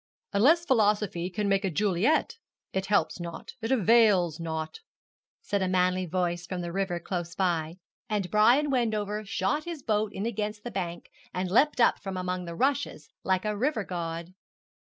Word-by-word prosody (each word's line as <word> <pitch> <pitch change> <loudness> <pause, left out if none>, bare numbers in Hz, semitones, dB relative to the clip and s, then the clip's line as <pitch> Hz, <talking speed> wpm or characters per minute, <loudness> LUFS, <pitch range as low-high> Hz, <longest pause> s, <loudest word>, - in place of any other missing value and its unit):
'"Unless 305 +12 +4
philosophy 210 - +2
can 205 +2 -2
make 195 0 +2
a 195 - +1
Juliet, 210 - +1 0.3
it 190 0 -1
helps 200 -2 +1
not, 170 -1 -7
it 225 - -2
avails 210 - +4
not,"' 160 - -4 0.6
said 200 -1 -1
a 190 - +1
manly 185 0 +1
voice 175 0 -1
from 185 -1 -4
the 170 -1 -4
river 190 -1 -1
close 170 -1 -4
by, 170 -3 0 0.3
and 200 -4 -1
Brian 245 +8 +4
Wendover 215 -4 0
shot 200 +8 -1
his 335 -5 -6
boat 215 -2 0
in 200 +1 -4
against 210 -2 -3
the 240 - -5
bank 175 -3 -5 0.2
and 180 0 -2
leapt 275 +7 +3
up 235 - +4
from 195 -2 -5
among 180 0 -3
the 170 -1 -6
rushes 270 - -1
like 190 +1 +1
a 210 0 0
river 235 0 0
god. 170 -1 -5
195 Hz, 170 wpm, -28 LUFS, 175-220 Hz, 0.6 s, Unless